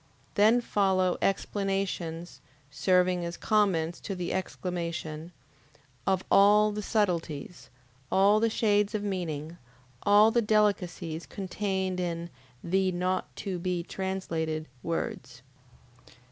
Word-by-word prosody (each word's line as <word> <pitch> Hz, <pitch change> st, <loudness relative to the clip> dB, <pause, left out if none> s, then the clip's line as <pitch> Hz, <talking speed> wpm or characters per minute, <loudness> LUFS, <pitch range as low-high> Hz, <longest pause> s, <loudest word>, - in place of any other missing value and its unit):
Then 220 Hz, +4 st, +5 dB
follow 190 Hz, -5 st, +1 dB
explanations, 195 Hz, -4 st, -2 dB, 0.3 s
serving 180 Hz, +2 st, +2 dB
as 170 Hz, 0 st, -5 dB
comments 185 Hz, -6 st, +1 dB
to 195 Hz, -, -5 dB
the 180 Hz, -1 st, -3 dB
exclamation, 170 Hz, -3 st, -4 dB, 0.8 s
of 190 Hz, -1 st, +2 dB
all 210 Hz, +2 st, +6 dB
the 210 Hz, 0 st, -4 dB
subtleties, 180 Hz, -7 st, -2 dB, 0.4 s
all 200 Hz, +2 st, +5 dB
the 230 Hz, +1 st, +2 dB
shades 210 Hz, -1 st, +1 dB
of 205 Hz, -, -2 dB
meaning, 170 Hz, -5 st, -4 dB, 0.4 s
all 210 Hz, +2 st, +6 dB
the 235 Hz, -, +3 dB
delicacies 185 Hz, -6 st, 0 dB
contained 190 Hz, -1 st, -2 dB
in 170 Hz, -1 st, -3 dB, 0.3 s
THE 190 Hz, +2 st, +1 dB
NOT 185 Hz, +1 st, -2 dB
TO 190 Hz, -3 st, -4 dB
BE 180 Hz, -1 st, -2 dB
TRANSLATED 165 Hz, -5 st, -3 dB
words. 130 Hz, -6 st, -4 dB
185 Hz, 105 wpm, -28 LUFS, 170-205 Hz, 0.8 s, all